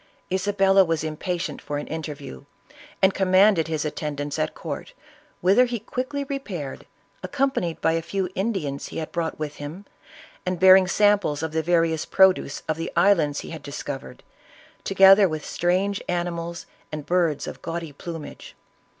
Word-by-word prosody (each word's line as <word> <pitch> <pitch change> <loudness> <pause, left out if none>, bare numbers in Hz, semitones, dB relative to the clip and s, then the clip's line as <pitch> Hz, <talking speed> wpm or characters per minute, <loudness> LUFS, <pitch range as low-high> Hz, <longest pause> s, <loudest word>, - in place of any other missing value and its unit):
Isabella 195 0 +4
was 165 -3 -1
impatient 170 +3 -3
for 145 - -4
an 145 - -4
interview, 150 - -7 0.6
and 190 0 +5
commanded 190 -2 +4
his 155 -1 -2
attendance 145 -1 -4
at 155 0 -1
court, - - -6 0.5
whither 200 +7 +5
he 240 -1 -3
quickly 260 +6 -4
repaired, 210 - -6 0.3
accompanied 270 - -1
by - - +3
a 165 0 0
few 190 +3 -2
Indians 190 -10 -2
he - - -8
had 160 - -4
brought 165 -2 -2
with 150 -1 -5
him, 155 +8 -8 0.6
and 180 -1 -2
bearing 190 0 +7
samples 200 -7 +2
of 160 - -2
the 160 +1 0
vari 165 0 +2
ous 160 - -3
produce 190 -7 +3
of 155 -1 -1
the 165 - -4
islands 170 -5 +3
he - - -9
had 160 -2 -7
discovered, 145 -1 -7 0.6
together 195 0 +6
with 155 -1 -5
strange 185 +3 0
animals, 170 -1 -3 0.3
and 150 -2 -5
Birds 170 -5 +1
of - - -8
gaudy 165 -2 -5
plumage. 165 +1 -8
170 Hz, 155 wpm, -24 LUFS, 155-195 Hz, 0.6 s, bearing